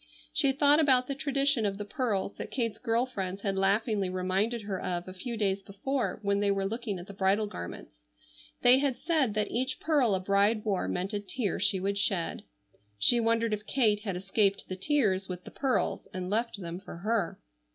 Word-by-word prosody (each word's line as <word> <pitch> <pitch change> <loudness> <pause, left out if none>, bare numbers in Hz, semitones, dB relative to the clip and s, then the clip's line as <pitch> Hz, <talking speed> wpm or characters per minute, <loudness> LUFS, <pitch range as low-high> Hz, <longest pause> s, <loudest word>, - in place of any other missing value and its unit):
She 275 -2 +3
thought 290 +2 +5
about 260 -5 +4
the 275 - -3
tradition 275 -2 +1
of 200 -1 -1
the 205 - -5
pearls 205 -4 -2
that - - -6
Kate's 230 -5 -2
girl 235 0 +1
friends 195 -6 -5
had 195 -2 -1
laughingly 195 +1 +1
reminded 190 +5 0
her 195 -2 -4
of 175 0 -3
a 185 - -7
few 230 +5 -5
days 195 -2 +1
before 245 +7 -2
when 200 0 +1
they 205 0 +2
were 195 -1 0
looking 220 -1 -3
at 175 - -8
the 200 - -10
bridal 195 +2 +2
garments. 85 - -8 0.6
They 250 +2 +7
had 275 -3 0
said 285 -11 +1
that 210 0 0
each 260 +3 -1
pearl 280 -10 +2
a - - 0
bride 200 +3 +2
wore 195 - 0
meant 185 - -2
a 205 - 0
tear 205 +2 -2
she 195 -1 +2
would 200 +2 -1
shed. 195 -4 0 0.6
She 240 - +4
wondered 230 -1 +1
if 210 0 -4
Kate 220 -6 +2
had 200 -3 -4
escaped 195 +2 +1
the 185 - -4
tears 195 -4 +1
with 180 0 -5
the - - -11
pearls, 270 -2 -1
and 185 0 -4
left 230 0 -1
them 170 -1 -6
for 190 - -10
her. 205 -1 -1
205 Hz, 205 wpm, -29 LUFS, 190-240 Hz, 0.6 s, They